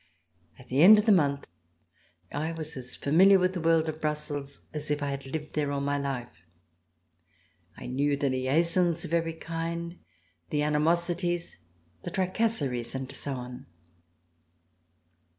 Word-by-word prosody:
At 130 Hz, -, -16 dB
the 135 Hz, +3 st, +2 dB
end 210 Hz, +5 st, +10 dB
of 210 Hz, +2 st, +1 dB
a -, -, +7 dB
month 140 Hz, -7 st, +2 dB, 0.9 s
I 155 Hz, +3 st, -2 dB
was 160 Hz, -1 st, -7 dB
as 125 Hz, -2 st, -6 dB
familiar 190 Hz, +7 st, +5 dB
with 185 Hz, 0 st, +1 dB
the 180 Hz, -, -3 dB
world 165 Hz, 0 st, +3 dB
of 155 Hz, 0 st, -5 dB
Brussels 145 Hz, -2 st, -3 dB
as 150 Hz, -1 st, -4 dB
if 150 Hz, 0 st, -1 dB
I 140 Hz, -, -1 dB
had 140 Hz, 0 st, -6 dB
lived 155 Hz, +2 st, -5 dB
there 145 Hz, -2 st, -1 dB
all 140 Hz, -, -1 dB
my 140 Hz, 0 st, -1 dB
life. 125 Hz, -, -5 dB, 1.4 s
I -, -, -9 dB
knew 140 Hz, +3 st, 0 dB
the 140 Hz, -1 st, 0 dB
liaisons 165 Hz, +6 st, +2 dB
of 165 Hz, -, -6 dB
every 165 Hz, -1 st, +1 dB
kind, 170 Hz, +1 st, -5 dB, 0.5 s
the 150 Hz, 0 st, 0 dB
animosities, 170 Hz, +3 st, 0 dB, 0.4 s
the -, -, -5 dB
tracasseries 185 Hz, -, -1 dB
and 130 Hz, 0 st, -5 dB
so 140 Hz, 0 st, -4 dB
on. 125 Hz, 0 st, -8 dB
150 Hz, 150 wpm, -28 LUFS, 140-170 Hz, 1.4 s, end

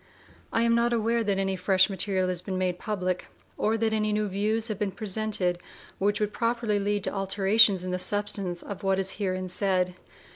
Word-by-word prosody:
I 230 Hz, -, +1 dB
am 235 Hz, 0 st, +3 dB
not 235 Hz, +1 st, +2 dB
aware 230 Hz, 0 st, +1 dB
that 200 Hz, -2 st, 0 dB
any 195 Hz, 0 st, 0 dB
fresh 190 Hz, +1 st, +4 dB
material 190 Hz, -1 st, 0 dB
has 180 Hz, -1 st, +1 dB
been 185 Hz, 0 st, -4 dB
made 180 Hz, -1 st, -1 dB
public, 185 Hz, -4 st, -2 dB, 0.3 s
or 220 Hz, +1 st, 0 dB
that 220 Hz, 0 st, 0 dB
any 215 Hz, -1 st, 0 dB
new 210 Hz, 0 st, 0 dB
views 215 Hz, +3 st, 0 dB
have 215 Hz, -4 st, -4 dB
been 210 Hz, -, 0 dB
presented 195 Hz, -3 st, -1 dB, 0.4 s
which 205 Hz, +1 st, +1 dB
would 210 Hz, -1 st, -1 dB
properly 230 Hz, -3 st, 0 dB
lead 205 Hz, 0 st, -1 dB
to -, -, -2 dB
alterations 195 Hz, 0 st, +3 dB
in 185 Hz, -, -3 dB
the 180 Hz, -, -2 dB
substance 200 Hz, -2 st, -1 dB
of 200 Hz, -2 st, -7 dB
what 195 Hz, -1 st, +1 dB
is 190 Hz, 0 st, +2 dB
herein 185 Hz, -2 st, -2 dB
said. 185 Hz, -1 st, +1 dB
200 Hz, 195 wpm, -27 LUFS, 185-215 Hz, 0.4 s, fresh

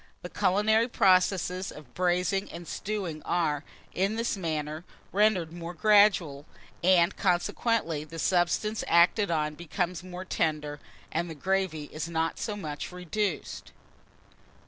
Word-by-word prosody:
The 175 Hz, -, -7 dB
culinary 210 Hz, +4 st, +3 dB
processes 185 Hz, -3 st, +2 dB
of 145 Hz, -5 st, -13 dB
braising 180 Hz, +2 st, 0 dB
and 170 Hz, -1 st, -9 dB
stewing 190 Hz, -7 st, -4 dB
are, 155 Hz, -4 st, 0 dB, 0.3 s
in 195 Hz, +4 st, 0 dB
this 230 Hz, 0 st, -1 dB
manner, 155 Hz, -3 st, -3 dB, 0.3 s
rendered 190 Hz, -5 st, +2 dB
more 175 Hz, 0 st, -7 dB
gradual, 200 Hz, -9 st, +4 dB, 0.4 s
and 180 Hz, 0 st, +4 dB
consequently 175 Hz, -2 st, 0 dB
the 165 Hz, +2 st, -10 dB
substance 180 Hz, +6 st, +1 dB
acted 180 Hz, +5 st, +4 dB
on 150 Hz, -2 st, 0 dB
becomes 175 Hz, +2 st, -3 dB
more 185 Hz, 0 st, -7 dB
tender, 150 Hz, -4 st, -1 dB, 0.3 s
and 170 Hz, +2 st, -1 dB
the 160 Hz, -, -7 dB
gravy 190 Hz, -2 st, -1 dB
is 155 Hz, +1 st, -4 dB
not 165 Hz, 0 st, -1 dB
so 215 Hz, -3 st, -3 dB
much 155 Hz, -6 st, -5 dB
reduced. 180 Hz, +1 st, -3 dB
175 Hz, 125 wpm, -28 LUFS, 160-195 Hz, 0.4 s, gradual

